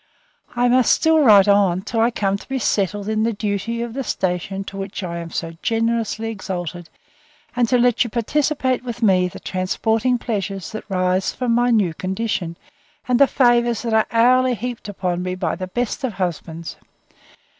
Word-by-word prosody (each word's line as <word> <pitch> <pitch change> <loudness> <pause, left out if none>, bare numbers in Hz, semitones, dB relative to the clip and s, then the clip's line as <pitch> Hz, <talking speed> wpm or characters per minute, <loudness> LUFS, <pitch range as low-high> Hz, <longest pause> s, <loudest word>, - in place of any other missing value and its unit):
I 245 +1 +2
must 250 -1 +4
still 320 0 +4
write 210 -8 +6
on, 195 -3 +3
till 225 - -3
I 230 +1 +4
come 200 -4 -1
to 200 - -9
be 270 - -1
settled 205 -3 -1
in 215 0 0
the 230 +1 +1
duty 215 +3 -2
of 235 -1 -6
the 270 +2 -3
station 190 -1 -2
to 195 - -9
which 195 0 -5
I 170 -1 -4
am 170 0 -7
so 165 0 -4
generously 225 -1 -1
exalted, 175 -4 -6 0.7
and 240 -2 +2
to 250 - +4
let 245 -1 +3
you 240 - -5
participate 260 +2 0
with 240 -1 -5
me 185 -3 +4
the 180 - -9
transporting 220 +6 0
pleasures 195 -6 -4
that 215 0 -8
rise 185 0 +1
from 250 -2 -1
my 245 +1 +3
new 205 -8 +2
condition, 185 -2 -3 0.5
and 250 0 +2
the 280 - +7
favours 240 -3 +2
that 230 -2 -2
are 220 0 +3
hourly 250 +2 +4
heaped 235 -1 -6
upon 180 -3 -2
me 185 0 -3
by 185 -1 -2
the 185 - -5
best 245 +7 -3
of 255 -4 -1
husbands. 170 -3 -4
220 Hz, 185 wpm, -21 LUFS, 185-240 Hz, 0.7 s, the